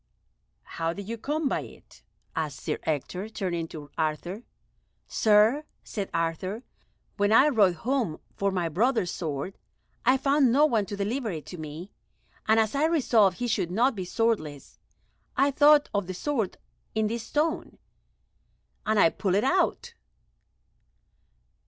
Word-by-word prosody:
"How 165 Hz, 0 st, -3 dB
did 200 Hz, +1 st, -8 dB
you 230 Hz, -, -3 dB
come 295 Hz, +6 st, -2 dB
by -, -, 0 dB
it?" -, -, -14 dB, 0.3 s
asked 155 Hz, -3 st, -3 dB
Sir -, -, -2 dB
Ector, 180 Hz, +7 st, -2 dB
turning 175 Hz, -6 st, -3 dB
to 150 Hz, -3 st, -10 dB
Arthur. 160 Hz, +6 st, -2 dB, 0.7 s
"Sir," 220 Hz, +7 st, +4 dB, 0.2 s
said 200 Hz, -3 st, -5 dB
Arthur, 165 Hz, +7 st, -2 dB, 0.5 s
"when 205 Hz, +1 st, +2 dB
I 265 Hz, +7 st, +6 dB
rode 205 Hz, -9 st, +4 dB
home 230 Hz, -, -1 dB, 0.2 s
for 200 Hz, -, 0 dB
my 180 Hz, -3 st, -1 dB
brother's 200 Hz, -, +1 dB
sword, 160 Hz, +2 st, -4 dB, 0.4 s
I 255 Hz, +2 st, +4 dB
found 275 Hz, -1 st, +3 dB
no 290 Hz, +5 st, +5 dB
one 225 Hz, -9 st, +1 dB
to 205 Hz, -, -5 dB
deliver 225 Hz, +4 st, -2 dB
it 155 Hz, -6 st, -5 dB
to -, -, -6 dB
me, 155 Hz, +5 st, -8 dB, 0.6 s
and 220 Hz, +1 st, +5 dB
as 220 Hz, -1 st, +1 dB
I 285 Hz, +2 st, +2 dB
resolved 235 Hz, -, +3 dB
he 245 Hz, -, -2 dB
should 200 Hz, -7 st, 0 dB
not 235 Hz, +9 st, +2 dB
be 195 Hz, -4 st, -4 dB
swordless, 180 Hz, -, -2 dB, 0.6 s
I 280 Hz, +1 st, +4 dB
thought 290 Hz, +1 st, +6 dB
of 200 Hz, -3 st, -1 dB
the 185 Hz, -, -5 dB
sword 230 Hz, -3 st, -2 dB, 0.4 s
in 220 Hz, 0 st, +2 dB
this 225 Hz, +1 st, -3 dB
stone, 315 Hz, +3 st, -1 dB, 1.1 s
and 215 Hz, 0 st, +2 dB
I 165 Hz, -, +6 dB
pulled 190 Hz, -3 st, -1 dB
it 205 Hz, -, +2 dB
out." 380 Hz, -, +1 dB
210 Hz, 150 wpm, -27 LUFS, 175-255 Hz, 1.1 s, I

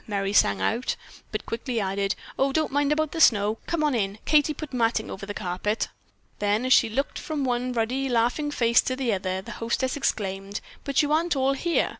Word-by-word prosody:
Merry 200 Hz, -2 st, -1 dB
sang 100 Hz, -, +4 dB
out, 230 Hz, -, 0 dB, 0.4 s
but -, -, -4 dB
quickly 235 Hz, +1 st, -3 dB
added: 195 Hz, 0 st, -1 dB, 0.2 s
"Oh, 270 Hz, +1 st, +3 dB
don't 310 Hz, +2 st, 0 dB
mind 285 Hz, +1 st, +1 dB
about 310 Hz, 0 st, +1 dB
the 325 Hz, -, -2 dB
snow. 215 Hz, -4 st, +4 dB
Come 335 Hz, -2 st, 0 dB
on 300 Hz, -2 st, +2 dB
in. 200 Hz, -3 st, -1 dB
Katie 300 Hz, 0 st, +4 dB
put 300 Hz, -2 st, -7 dB
matting 230 Hz, -2 st, 0 dB
over 195 Hz, +1 st, -7 dB
the 205 Hz, -, -4 dB
carpet." 195 Hz, +3 st, -2 dB, 0.5 s
Then 210 Hz, +4 st, +1 dB
as 255 Hz, -, +5 dB
she 230 Hz, -, +5 dB
looked 275 Hz, +6 st, -2 dB
from 305 Hz, -3 st, -3 dB
one 250 Hz, 0 st, 0 dB
ruddy, 250 Hz, +3 st, -1 dB
laughing 245 Hz, +5 st, +1 dB
face 235 Hz, -4 st, +3 dB
to 255 Hz, -, -2 dB
another, 190 Hz, -6 st, -1 dB
the -, -, -8 dB
hostess 245 Hz, +3 st, 0 dB
exclaimed: 195 Hz, -6 st, -2 dB, 0.3 s
"But 280 Hz, +2 st, +2 dB
you 295 Hz, -, -1 dB
aren't 330 Hz, +1 st, +2 dB
all 270 Hz, 0 st, +2 dB
here. 335 Hz, +5 st, +1 dB
240 Hz, 200 wpm, -26 LUFS, 205-280 Hz, 0.5 s, as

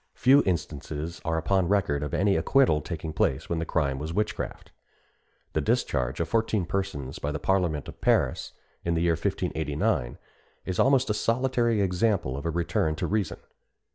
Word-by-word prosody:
Few 135 Hz, +3 st, +6 dB
instances 80 Hz, -1 st, -3 dB
are 80 Hz, -1 st, 0 dB
upon 95 Hz, +2 st, +1 dB
record 90 Hz, -8 st, +1 dB
of 75 Hz, -2 st, -3 dB
any 100 Hz, +1 st, +2 dB
acquittal 80 Hz, -, +3 dB
taking 80 Hz, +1 st, -5 dB
place 65 Hz, +1 st, 0 dB
when 85 Hz, -, -1 dB
the 80 Hz, -, -3 dB
crime 70 Hz, -5 st, 0 dB
was 80 Hz, +3 st, -5 dB
witchcraft. 105 Hz, 0 st, -3 dB, 0.8 s
The -, -, +1 dB
discharge 65 Hz, +2 st, 0 dB
of 85 Hz, -, 0 dB
fourteen 110 Hz, -4 st, +1 dB
persons 85 Hz, -8 st, -3 dB
by 75 Hz, -, -2 dB
the 75 Hz, -, -2 dB
parliament 85 Hz, -3 st, 0 dB
of -, -, -11 dB
Paris, -, -, +1 dB, 0.3 s
in 85 Hz, 0 st, 0 dB
the 80 Hz, -, +1 dB
year 85 Hz, -1 st, +3 dB
1589, 75 Hz, -6 st, -1 dB, 0.5 s
is 95 Hz, -1 st, -3 dB
almost 135 Hz, -3 st, +4 dB
a -, -, +2 dB
solitary 120 Hz, -1 st, +1 dB
example 90 Hz, -, +1 dB
of 70 Hz, +4 st, -4 dB
a -, -, +1 dB
return 80 Hz, -1 st, 0 dB
to -, -, -2 dB
reason. 105 Hz, -5 st, -1 dB
85 Hz, 170 wpm, -27 LUFS, 75-100 Hz, 0.8 s, Few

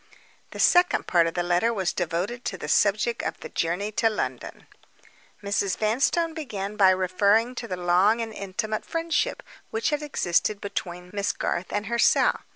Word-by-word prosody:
The -, -, -10 dB
second 355 Hz, 0 st, +4 dB
part 170 Hz, -2 st, +3 dB
of 165 Hz, -, -4 dB
the 175 Hz, -, 0 dB
letter 175 Hz, +6 st, +2 dB
was 190 Hz, -6 st, -1 dB
devoted 180 Hz, +8 st, -3 dB
to 190 Hz, -, -3 dB
the 150 Hz, -, -7 dB
subject 210 Hz, +8 st, +2 dB
of -, -, -4 dB
the -, -, -7 dB
journey 180 Hz, +6 st, -2 dB
to 225 Hz, +1 st, +2 dB
London. 215 Hz, -, -5 dB, 0.8 s
Mrs. 200 Hz, -1 st, 0 dB
Vanstone 275 Hz, +10 st, +1 dB
began 210 Hz, -10 st, -5 dB
by 195 Hz, -3 st, +6 dB
referring 200 Hz, +6 st, +2 dB
to 235 Hz, -, -7 dB
the 185 Hz, -3 st, -4 dB
long 180 Hz, +6 st, +3 dB
and 225 Hz, -1 st, -4 dB
intimate 210 Hz, +2 st, -3 dB
friendship 330 Hz, -1 st, -1 dB, 0.3 s
which 445 Hz, -7 st, -1 dB
had 295 Hz, 0 st, -1 dB
existed 210 Hz, -, 0 dB
between 180 Hz, -3 st, -6 dB
Miss 200 Hz, 0 st, 0 dB
Garth 175 Hz, -, -3 dB
and 205 Hz, 0 st, -2 dB
herself. 235 Hz, +2 st, +3 dB
205 Hz, 165 wpm, -25 LUFS, 185-235 Hz, 0.8 s, by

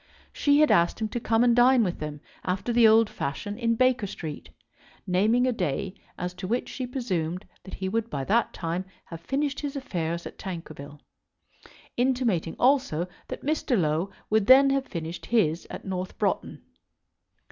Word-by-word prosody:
She 285 Hz, 0 st, +3 dB
had 305 Hz, -, +5 dB
asked 170 Hz, +5 st, +3 dB
him 220 Hz, -1 st, -2 dB
to 240 Hz, -, -3 dB
come 225 Hz, 0 st, +2 dB
and 240 Hz, -1 st, +4 dB
dine 245 Hz, 0 st, +5 dB
with 180 Hz, -4 st, -2 dB
them 150 Hz, -1 st, -6 dB, 0.2 s
after 190 Hz, +6 st, -2 dB
the 230 Hz, -1 st, +6 dB
old 220 Hz, 0 st, +6 dB
fashion 205 Hz, +5 st, -4 dB
in 230 Hz, -1 st, +1 dB
Baker 255 Hz, -3 st, +2 dB
Street, 155 Hz, -5 st, -7 dB, 0.6 s
naming 215 Hz, +7 st, +3 dB
a 255 Hz, -, +2 dB
day 185 Hz, -, -2 dB, 0.2 s
as 180 Hz, 0 st, -4 dB
to 180 Hz, +1 st, -6 dB
which 240 Hz, +5 st, -1 dB
she 255 Hz, -2 st, -4 dB
presumed 185 Hz, -8 st, -3 dB, 0.2 s
that 190 Hz, -, -8 dB
he 190 Hz, -, -4 dB
would 225 Hz, +3 st, -1 dB
by 140 Hz, -2 st, -3 dB
that 225 Hz, -, +2 dB
time 170 Hz, +2 st, -3 dB, 0.2 s
have 165 Hz, -1 st, -9 dB
finished 275 Hz, -, -1 dB
his 290 Hz, -1 st, -4 dB
affairs 170 Hz, -, -3 dB
at -, -, -9 dB
Tankerville, 155 Hz, -5 st, -8 dB, 1.0 s
intimating 240 Hz, -10 st, +1 dB
also 250 Hz, -, +2 dB, 0.2 s
that -, -, -7 dB
Mr. 290 Hz, -6 st, +1 dB
Low 160 Hz, +3 st, 0 dB, 0.2 s
would 215 Hz, -2 st, +2 dB
then 270 Hz, +1 st, +8 dB
have 275 Hz, -1 st, 0 dB
finished 165 Hz, 0 st, -6 dB
his 175 Hz, -8 st, +1 dB
at -, -, -8 dB
North 185 Hz, -1 st, -4 dB
Broughton. -, -, -2 dB
205 Hz, 170 wpm, -26 LUFS, 170-245 Hz, 1.0 s, then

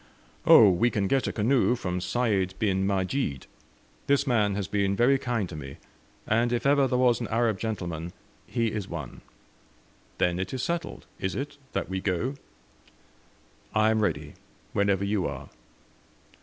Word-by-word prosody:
"Oh, 105 Hz, -4 st, +9 dB
we 90 Hz, +7 st, +2 dB
can 105 Hz, -4 st, -1 dB
get 135 Hz, +5 st, +1 dB
a -, -, -1 dB
canoe 120 Hz, +3 st, +2 dB
from 90 Hz, -6 st, -3 dB
Sayd 100 Hz, -3 st, 0 dB
bin 95 Hz, -2 st, +1 dB
Majid. 95 Hz, -, -1 dB, 0.6 s
This 140 Hz, 0 st, +3 dB
man 105 Hz, -6 st, +2 dB
has 100 Hz, -2 st, -2 dB
been 100 Hz, -1 st, 0 dB
very 130 Hz, +5 st, +3 dB
kind 120 Hz, -7 st, -1 dB
to 85 Hz, -, -8 dB
me, 70 Hz, -2 st, -8 dB, 0.5 s
and 115 Hz, +2 st, +1 dB
if 120 Hz, +1 st, -1 dB
ever 140 Hz, -1 st, +4 dB
there 125 Hz, -, 0 dB
was 125 Hz, -1 st, +3 dB
an 115 Hz, -, -2 dB
Arab 115 Hz, -3 st, +1 dB
gentleman, 85 Hz, -6 st, -4 dB, 0.4 s
he 115 Hz, -2 st, 0 dB
is 105 Hz, -3 st, -4 dB
one." 75 Hz, -7 st, -7 dB, 1.0 s
"Then 90 Hz, 0 st, +1 dB
it 95 Hz, +7 st, -3 dB
is 130 Hz, -, -3 dB
settled, 170 Hz, +2 st, -3 dB
is 95 Hz, -1 st, -2 dB
it, 145 Hz, +2 st, -5 dB, 0.2 s
that -, -, -2 dB
we 95 Hz, 0 st, -3 dB
go?" 100 Hz, +8 st, -1 dB, 1.4 s
"I 110 Hz, 0 st, +4 dB
am 110 Hz, -, +1 dB
ready, 75 Hz, -7 st, -1 dB, 0.4 s
whenever 100 Hz, -1 st, +1 dB
you 100 Hz, -2 st, 0 dB
are." 70 Hz, -1 st, -7 dB
105 Hz, 160 wpm, -27 LUFS, 95-120 Hz, 1.4 s, Oh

